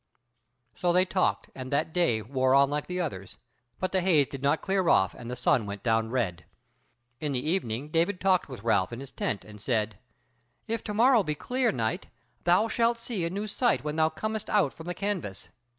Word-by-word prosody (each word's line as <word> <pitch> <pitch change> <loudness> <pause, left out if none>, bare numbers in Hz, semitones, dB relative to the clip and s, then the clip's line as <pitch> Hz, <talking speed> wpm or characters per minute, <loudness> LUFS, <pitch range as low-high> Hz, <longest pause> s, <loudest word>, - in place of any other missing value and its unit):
So 175 -1 0
they 180 +1 +4
talked, 185 0 0
and 130 -1 -7
that 155 +3 0
day 120 -12 +2
wore 130 +2 +2
like 145 +2 -3
the 180 0 -3
others, 100 - -4 0.4
but 185 - -1
the 190 - +2
haze 165 -6 +4
did 135 0 -8
not 140 +3 +1
clear 190 -3 +1
off, 95 0 +4
and 120 - -9
the 125 - -3
sun 125 -3 +2
went 100 0 -6
down 115 -1 +1
red. 100 -10 -1 0.8
In 150 -2 -2
the 130 +3 -2
evening 140 -6 -2
David 170 +4 +1
talked 185 -4 +2
with 125 -6 -8
Ralph 110 -4 +2
in 120 - -6
his 135 -1 -9
tent, 105 - -3
and 105 -1 -12
said: 110 -4 -1 0.7
"If 230 -1 -3
to 210 - -4
morrow 240 +1 +5
be 155 -5 -2
clear, 250 - 0
knight, 115 -4 -2 0.4
thou 180 +6 +4
shalt 230 +1 +1
see 230 -6 -3
a - - -1
new 200 +4 -3
sight 235 - +1
when 150 0 -3
thou 160 0 +3
comest 215 +6 -4
out 200 -10 +2
from 160 - -11
the 180 - -3
canvas." 185 - -4
155 Hz, 205 wpm, -28 LUFS, 120-190 Hz, 0.8 s, morrow